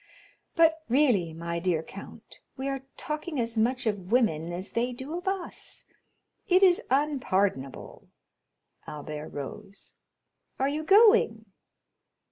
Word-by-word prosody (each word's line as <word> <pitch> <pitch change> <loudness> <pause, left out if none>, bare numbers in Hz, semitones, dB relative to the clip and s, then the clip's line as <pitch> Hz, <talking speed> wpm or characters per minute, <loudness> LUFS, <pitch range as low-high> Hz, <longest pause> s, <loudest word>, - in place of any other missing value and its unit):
But 325 -1 +4
really, 235 - +3
my 170 +1 -4
dear 170 -2 0
count, - - -12 0.2
we 265 +1 -3
are 270 -1 -4
talking 300 -1 -4
as 230 -1 -1
much 240 +3 +1
of 205 -3 -2
women 175 -10 +2
as 180 +3 -4
they 245 +2 0
do 265 +6 -6
of 355 +2 -6
us; 385 -2 -4 0.6
it 370 +1 +5
is 360 -2 +6
unpardonable." 205 - -1 0.8
Albert 150 0 -6
rose. 200 +8 -7 0.6
"Are 265 - +1
you 300 +2 -2
going?" 395 - +5
240 Hz, 120 wpm, -28 LUFS, 180-300 Hz, 0.8 s, is